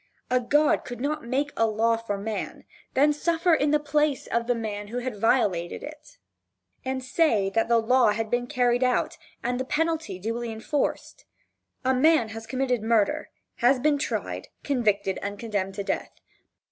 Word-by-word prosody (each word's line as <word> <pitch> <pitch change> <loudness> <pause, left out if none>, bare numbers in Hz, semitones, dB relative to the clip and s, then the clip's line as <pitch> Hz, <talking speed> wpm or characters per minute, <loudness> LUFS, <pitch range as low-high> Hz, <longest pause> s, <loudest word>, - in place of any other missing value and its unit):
A 255 - +4
god 295 +5 +2
could 245 -1 -7
not 295 +1 -2
make 280 +4 0
a 225 - +3
law 225 +1 +2
for 225 -3 -4
man, 215 +2 -5 0.3
then 290 +3 +5
suffer 335 +3 +1
in 295 -2 +3
the 300 +1 +3
place 295 -1 0
of 235 0 -1
the 245 - +2
man 210 -2 -4
who 235 +4 -5
had 245 -4 -4
violated 195 -8 +1
it, 305 +10 -11 0.7
and 260 0 -3
say 245 - +2
that 225 +2 +1
the 235 - +4
law 245 +1 +4
had 220 +1 -1
been 245 0 0
carried 245 0 +2
out, 250 0 0 0.2
and 245 +1 -1
the - - 0
penalty 320 - -1
duly 230 +4 -3
enforced. 285 - -3 0.6
A 260 - +3
man 265 -2 +4
has 225 0 -8
committed 255 -3 0
murder, 220 -2 +1 0.3
has 250 +2 +4
been 290 +2 +2
tried, - - -3 0.2
convicted 210 -8 0
and 200 0 -4
condemned 200 -4 -3
to 200 - -3
death. - - -2
245 Hz, 170 wpm, -26 LUFS, 220-285 Hz, 0.7 s, then